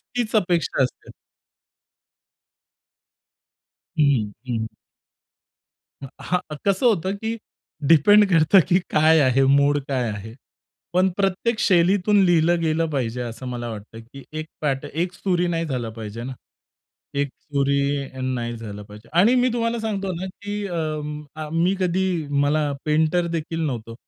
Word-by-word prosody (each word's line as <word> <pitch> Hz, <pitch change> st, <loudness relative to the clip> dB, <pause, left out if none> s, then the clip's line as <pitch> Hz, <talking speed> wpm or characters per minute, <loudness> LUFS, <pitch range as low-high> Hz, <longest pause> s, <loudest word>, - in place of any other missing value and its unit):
तीच 235 Hz, -2 st, -1 dB
अपेक्षा 175 Hz, -8 st, +2 dB
असते. 125 Hz, -, -5 dB, 2.9 s
हं, 135 Hz, -9 st, +2 dB, 0.2 s
हं. 115 Hz, -2 st, -1 dB, 1.4 s
अ, -, -, -5 dB
हां, 180 Hz, 0 st, 0 dB, 0.3 s
कसं 200 Hz, +5 st, +2 dB
होतं 195 Hz, -4 st, +2 dB
की 225 Hz, +2 st, -4 dB, 0.5 s
डिपेंड 205 Hz, +7 st, +6 dB
करतं, 165 Hz, +3 st, +6 dB
की 180 Hz, -, +4 dB
काय 155 Hz, +1 st, +5 dB
आहे, 135 Hz, -1 st, +3 dB
मूड 140 Hz, +2 st, +4 dB
काय 125 Hz, -4 st, 0 dB
आहे? 105 Hz, +2 st, -7 dB, 0.6 s
पण 185 Hz, +2 st, +3 dB
प्रत्येक 200 Hz, +4 st, 0 dB
शैलीतून 195 Hz, +2 st, +4 dB
लिहिलं 170 Hz, -1 st, +3 dB
गेलं 165 Hz, 0 st, +1 dB
पाहिजे 125 Hz, -4 st, -2 dB
असं 120 Hz, +2 st, -7 dB
मला 120 Hz, -1 st, -4 dB
वाटतं 110 Hz, +1 st, -9 dB
की 125 Hz, +4 st, -13 dB, 0.2 s
एक 155 Hz, -, -7 dB
पॅट 140 Hz, -2 st, -1 dB
एक 165 Hz, +5 st, -2 dB
सुरी 180 Hz, -2 st, 0 dB
नाही 165 Hz, -1 st, -1 dB
झालं 125 Hz, -6 st, -3 dB
पाहिजे 110 Hz, 0 st, -7 dB
ना. 130 Hz, +2 st, -5 dB, 0.8 s
एक 140 Hz, 0 st, 0 dB
सुरी 140 Hz, -1 st, -1 dB
नाही 120 Hz, -2 st, -2 dB
झालं 105 Hz, -2 st, -8 dB
पाहिजे. 105 Hz, +2 st, -14 dB
आणि 215 Hz, +8 st, +6 dB
मी 250 Hz, 0 st, +3 dB
तुम्हाला 230 Hz, 0 st, -1 dB
सांगतो 200 Hz, -4 st, -2 dB
ना 190 Hz, -, -3 dB, 0.2 s
की 205 Hz, 0 st, -4 dB
अ, 175 Hz, -3 st, -4 dB, 0.6 s
आ, 155 Hz, -1 st, -5 dB
मी 170 Hz, +4 st, +2 dB
कधी 185 Hz, +1 st, +1 dB, 0.4 s
मला 145 Hz, 0 st, +1 dB
पेंटर 160 Hz, +3 st, +2 dB
देखील 165 Hz, +1 st, -4 dB
नव्हतो. 115 Hz, -4 st, -5 dB
155 Hz, 135 wpm, -23 LUFS, 130-185 Hz, 2.9 s, डिपेंड